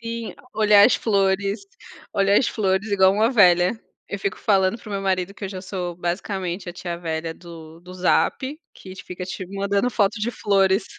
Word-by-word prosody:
Sim, 230 -1 -5 0.2
olhar 210 -1 +6
as - - +3
flores 200 -1 +1 0.5
olhar 200 +1 +3
as - - +1
flores 200 0 -1
igual 190 -1 +5
uma 215 +3 +2
velha, 180 -6 +5 0.4
eu 200 - -4
fico 195 0 -3
falando 195 +1 +2
para 220 - -13
o - - -6
meu 200 - -2
marido 190 0 -1
que 200 - -8
eu - - -3
já 190 -1 -7
sou 180 -2 -4
basicamente 180 +1 -3
a 175 - -5
tia 175 -1 -5
velha 160 -1 -3
do 165 -1 -12
do 180 +1 -12
zap, 260 - 0 0.2
que 185 -1 -11
fica 180 0 -7
te 185 +1 -6
mandando 200 +4 -1
foto 210 -1 0
de 225 +3 -1
flores. 195 -2 +2
195 Hz, 190 wpm, -22 LUFS, 180-205 Hz, 0.5 s, olhar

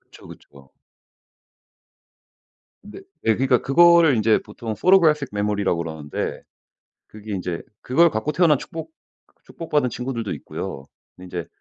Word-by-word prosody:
그쵸, - - -18
그쵸. 70 -1 -16 2.1
근데 210 - -11 0.2
네. 110 - +2
그러니까 130 +1 +2
그거를 170 -1 +5
인제 110 0 +3
보통 115 -2 -6
photographic 160 -7 +4
메모리라고 105 -3 -1
그러는데 80 -3 -5 0.7
그게 105 0 -9
인제 90 -2 -4 0.2
그걸 165 +7 +3
갖고 110 +6 -2
태어난 160 -2 +3
축복 165 - -8 0.3
그 - - -36
축복받은 150 -6 -2
친구들도 120 -3 -4
있고요. 70 - -7 0.3
근데 90 - -14
인제 85 - -4
120 Hz, 350 characters per minute, -22 LUFS, 100-155 Hz, 2.1 s, 그거를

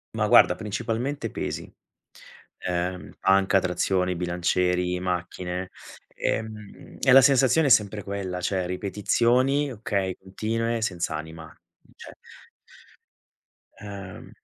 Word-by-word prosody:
Ma - - +1
guarda - - +6
principalmente 115 +4 -3
pesi, - - -5 1.0
ehm, 90 +1 -3
panca, 95 0 +3
trazioni, 90 0 0
bilancieri, 90 +1 0
macchine, 90 0 -4 0.4
ehm, 110 -2 -5
e 135 - +3
la 135 - +10
sensazione 135 +3 +4
è - - +2
sempre 105 -4 +3
quella, 95 -2 -4
cioè 95 0 -1
ripetizioni, 120 +9 +1
okay, 100 -4 -2
continue, 115 +4 -2
senz'anima, 80 -5 -4 0.5
cioè - - -12 1.6
Uhm, 100 -3 -9
95 Hz, 95 wpm, -25 LUFS, 90-115 Hz, 1.6 s, la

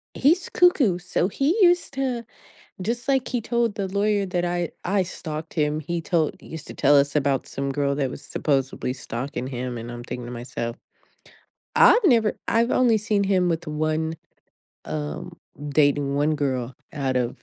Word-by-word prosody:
He's 330 +7 +3
cuckoo. 295 - +4
So 180 0 0
he 275 - +1
used 350 -4 +4
to 255 -4 -2 0.6
just 235 +7 -3
like 265 -2 +2
he 245 - -1
told 235 -3 0
the 195 -3 -2
lawyer 205 +1 +1
that 180 -1 -1
I 175 -1 -1
I 195 +1 +2
stalked 160 -3 -6
him, 150 -1 +1
he 170 +3 -3
told 165 -2 0
he - - -15
used 160 -2 -8
to - - -8
tell 145 0 +4
us 140 0 +3
about 140 -3 +1
some 140 0 -3
girl 140 0 0
that 135 -3 0
was - - -8
supposedly 135 -3 -1
stalking 130 +1 -5
him, 125 -1 -4
and 115 +1 -6
I'm 120 0 -7
thinking 125 0 -6
to 120 - -7
myself, 120 0 -5 1.0
I've 455 - +7
never 230 - +4
I've 230 +1 +2
only 245 -3 +4
seen 210 -1 +1
him 185 -2 +2
with 165 0 -1
1, 155 +1 -1 0.7
um 75 -1 -5 0.3
dating 145 -1 +2
1 150 +2 +2
girl 130 -4 -2 0.2
out 135 -4 -1
of 125 -1 -2
160 Hz, 175 wpm, -24 LUFS, 140-210 Hz, 1.0 s, I've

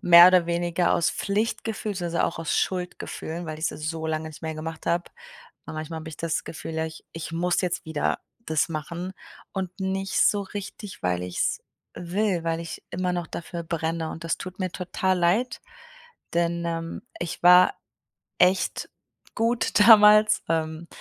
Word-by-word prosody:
mehr 175 0 +10
oder 180 -2 +4
weniger 175 0 +1
aus 165 - +2
Pflichtgefühl 215 +1 -2
beziehungsweise 175 -3 -1
auch - - -3
aus 165 - -1
Schuldgefühlen, 175 -2 -3
weil 155 0 -5
ich 155 - 0
es 155 +1 -3
so 160 -1 -4
lange 160 0 -2
nicht 155 - -12
mehr 160 -1 -3
gemacht 160 +1 -6
habe. 175 +1 0 0.6
Und - - -7
manchmal 155 +1 -5
habe 160 - -8
ich 160 - -8
das 165 -1 -1
Gefühl: 160 0 -7
„Ja, 160 0 -1
ich 160 - -10
ich 165 0 -6
muss 175 +2 +1
jetzt 180 -1 -2
wieder 160 -2 -1 0.3
das 160 +1 +1
machen,“ 170 +4 -5 0.4
und 190 -2 -3
nicht 190 0 -2
so 205 -1 +4
richtig, 200 0 -8
weil 90 0 0
ich's 90 -1 -1 0.3
will, 180 0 -1
weil 165 0 0
ich 165 -1 -7
immer 180 0 -1
noch 175 -1 -2
dafür 170 0 -6
brenne 165 0 -2
und 165 - -7
das 165 - -1
tut 185 -1 -8
mir 185 - -1
total 185 +1 -1
leid, 185 +9 +1 0.7
denn, 170 0 +1
ähm, 165 0 -4 0.2
ich 170 - -4
war 180 +1 +7 0.6
echt 185 +1 +2 0.4
gut 230 -1 +1
damals, 210 -1 +8
ähm, 160 0 -1
170 Hz, 170 wpm, -25 LUFS, 160-185 Hz, 0.7 s, mehr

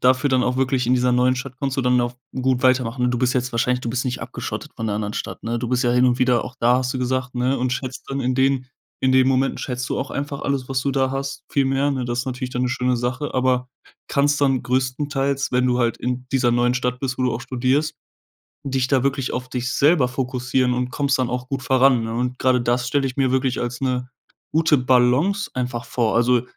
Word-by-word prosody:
dafür 130 +3 +3
dann 130 -2 +2
auch 125 - 0
wirklich, 130 -2 +1
in 125 - +4
dieser 125 0 +2
neuen 125 +1 +3
Stadt 130 0 -6
kannst 135 -1 -1
du 135 - +1
dann 125 0 +3
auch 120 0 -2 0.2
gut 130 0 +1
weitermachen. 125 -1 +2
Du - - 0
bist 125 0 +2
jetzt 125 -1 -1
wahrscheinlich 125 +2 +1
du 120 - -4
bist 120 +1 -1
nicht 125 -1 -3
abgeschottet - - -6
von 115 - -3
der 105 - -1
anderen 105 0 -3
Stadt, - - -5
ne? 115 +1 -1
Du 120 0 -3
bist 125 +1 +1
ja 120 - +3
hin 125 +1 +4
und 125 0 +2
wieder 125 -2 +2
auch 125 - -8
da, 120 +2 +4
hast 130 0 -1
du 130 - -2
gesagt, 130 0 -2
ne, 125 +2 +1
und 125 0 0
schätzt 130 +1 -5
dann 135 - -2
in 130 0 0
den 130 0 +1 0.3
in 130 0 +2
den 130 0 +5
Momenten 135 0 +1
schätzt 125 0 -4
du - - 0
auch 135 - -4
einfach 140 0 -4
alles, 135 -2 -2
was 135 -1 0
du 140 - 0
da 130 -1 +1
hast, 140 0 -4
viel 140 - +2
mehr, 135 +2 +1
ne? 130 -2 -2
Das 120 0 -1
ist 130 - -7
natürlich 125 0 -4
dann 125 0 -2
'ne 125 - +1
schöne 125 -1 0
Sache, 125 +4 -3
aber 125 -1 +1 0.4
kannst 145 +1 +2
dann 135 -3 +2
größtenteils, 135 +2 -1
wenn 125 0 +2
du 125 -1 +1
halt 120 -2 +1
in 125 0 -3
dieser 130 -2 +3
neuen 120 +1 +2
Stadt 125 0 -1
bist, 130 -2 -3
wo 130 - 0
du 125 - +1
auch - - -3
studierst, 130 +4 0 0.7
dich 130 -2 0
da 130 -2 +2
wirklich 135 -1 -1
auf 125 0 -4
dich 125 0 -2
selber 145 -2 +4
fokussieren 125 0 0
und 125 0 -1
kommst 140 0 0
dann 125 -2 0
auch 125 +1 -4
gut 135 -1 -2
voran, 130 -1 +4
ne? 115 - -4
Und 125 +2 -2
grade 125 -1 +3
das 120 0 0
stelle 140 +1 +1
ich 130 - -7
mir 135 -2 +2
wirklich 130 -1 0
als 120 0 -3
'ne 125 -1 -1 0.4
gute 160 -1 +3
Balance 130 +10 +2
einfach 125 -2 -3
vor. 115 -3 0
Also 120 +1 +3
125 Hz, 250 wpm, -22 LUFS, 125-135 Hz, 0.7 s, den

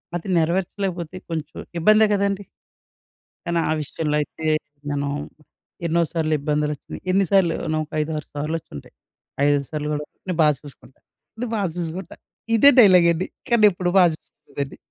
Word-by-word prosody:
అది 175 - -5
నెరవేర్చలేకపోతే 180 +1 -1
కొంచెం 160 -2 -5 0.2
ఇబ్బందే 215 +5 +6
కదండీ! 200 0 0 1.0
కానీ 170 0 0
ఆ - - +2
విషయంలో 150 +1 -2
అయితే 160 +2 -7 0.4
నేను 140 0 -1 0.8
ఎన్నో 170 +1 +2
సార్లు 155 -2 0
ఇబ్బందులొచ్చినయి. 150 0 -3
ఎన్ని 195 +1 +3
సార్లో 190 -4 +4 0.2
నొక 155 -1 -2
ఐదారు 150 -1 -3
సార్లు 150 +3 -2
వచ్చుంటాయి. 75 - -12 0.5
ఐదైదు 145 -1 +3
సార్లు 150 -1 -3
కూడా 150 0 -3 0.2
నే - - +1
బా 155 - +6
చూసుకుంటా. 145 -2 -15 0.4
నే - - 0
బా 205 - 0 0.2
చూసుకుంటా. 175 +2 -5 0.4
ఇదే 280 +6 +8
డైలాగ్ 185 -6 +7
అండి. 175 +3 -3 0.2
కానీ 230 -3 +6
ఎప్పుడు 175 -1 -2
బా - - +7
చూసుకోలేదండి. 140 -3 -8
165 Hz, 140 wpm, -22 LUFS, 150-185 Hz, 1.0 s, ఇదే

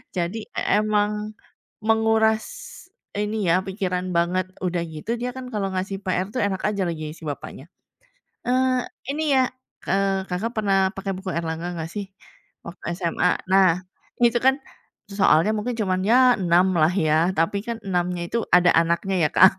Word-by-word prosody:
Jadi 180 +5 -2 0.2
emang 210 0 +1 0.5
menguras 220 0 +3 0.7
ini 210 -1 -1
ya, 185 +3 +3
pikiran 185 -2 -2
banget, 180 +2 +1 0.2
udah 180 -2 -1
gitu 160 +8 -4
dia 250 0 -2
kan 255 -1 -7
kalau 195 -2 -1
ngasih 190 +1 -2
PR 185 0 0
itu 250 - -4
enak 195 -2 -1
aja 200 -2 -1 0.3
si - - -16
bapaknya. 145 -1 -6 0.8
Eee, 255 0 +2 0.3
"Ini 310 +2 -2
ya," 260 -1 +5 0.5
eee, 195 0 +1
Kakak 205 +6 -2
pernah 200 -2 +2 0.2
pakai 195 0 -3
buku 190 0 -6
Erlangga 165 +1 -3
nggak 160 - -3
sih 205 +2 -5 0.6
waktu 170 +1 -10
SMA? 180 0 +1 0.2
Nah 190 -2 +6 0.5
itu 240 0 +4
kan 265 +1 +4 0.5
soalnya 200 -1 +3
mungkin 235 +3 -2
cuman 185 -3 0
ya 250 +3 +6
6 180 +2 +3
lah 155 +3 +4
ya, 160 -1 +2
tapi 165 +5 +1
kan 235 -1 -2
6-nya 180 -1 -1
itu 235 - 0
ada 180 0 +5
anaknya 170 +4 +1
ya - - +2
Kak. 190 - +7
195 Hz, 155 wpm, -23 LUFS, 180-215 Hz, 0.8 s, Kak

